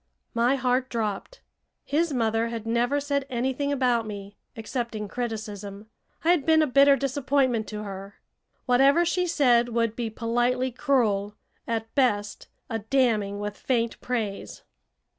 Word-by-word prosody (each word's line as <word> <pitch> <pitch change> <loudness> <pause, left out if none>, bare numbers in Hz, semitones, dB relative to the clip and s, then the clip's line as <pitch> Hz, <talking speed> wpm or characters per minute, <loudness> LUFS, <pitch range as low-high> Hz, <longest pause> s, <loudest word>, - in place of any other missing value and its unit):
My 240 +3 +2
heart 255 0 0
dropped. 225 - -4 0.4
His 325 +3 +1
mother 225 -3 +1
had 230 -1 -5
never 240 +5 +1
said 280 -1 -1
anything 260 +3 -1
about 250 -5 +1
me, 200 -1 -8 0.2
excepting 225 -1 -4
criticism. 215 -2 -6 0.3
I 335 - +4
had 345 -5 +2
been 315 0 +4
a - - +3
bitter 275 0 +5
disappointment 270 -4 0
to 210 -1 -5
her. 195 0 -8 0.5
Whatever 275 +7 +4
she 360 +1 0
said 245 -7 +3
would 230 -1 0
be 235 -2 -3
politely 240 +3 0
cruel 215 -7 +1 0.3
at 225 -1 -3
best, 210 -7 0 0.2
a 225 -3 -3
damning 215 -4 +1
with 205 0 -4
faint 235 -2 -1
praise. 220 -5 -4
240 Hz, 140 wpm, -26 LUFS, 215-270 Hz, 0.5 s, bitter